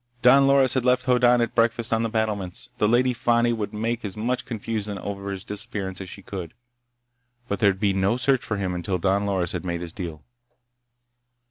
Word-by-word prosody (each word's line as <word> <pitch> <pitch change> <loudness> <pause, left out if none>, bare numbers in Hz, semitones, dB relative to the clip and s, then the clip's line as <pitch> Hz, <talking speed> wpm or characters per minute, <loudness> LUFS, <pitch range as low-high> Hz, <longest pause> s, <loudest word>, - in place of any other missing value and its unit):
Don 135 +2 +7
Loris 135 -2 +4
had 130 - 0
left 125 0 +2
Hoddan 125 -1 +4
at 115 - -1
breakfast 115 +1 +2
on 115 - +2
the 115 - 0
battlements. 105 -5 -3
The 105 - +3
Lady 125 +2 +3
Fani 120 0 +2
would 110 -3 -3
make 115 +2 -2
as 100 -1 -5
much 125 +4 -1
confusion 105 -3 -4
over 100 +1 -5
his 95 -1 -5
disappearance 100 -2 -4
as 95 - -7
she 100 - -10
could. 90 -5 -7 0.9
But 100 - -2
there'd 100 -3 +3
be 100 -2 +2
no 95 +5 +1
search 130 0 +2
for 105 - -3
him 95 -2 -2
until 90 +1 -2
Don 100 +3 +1
Loris 95 -3 0
had - - -4
made 85 -1 -3
his 85 -2 -5
deal. 80 -6 -6
105 Hz, 200 wpm, -24 LUFS, 95-120 Hz, 0.9 s, Don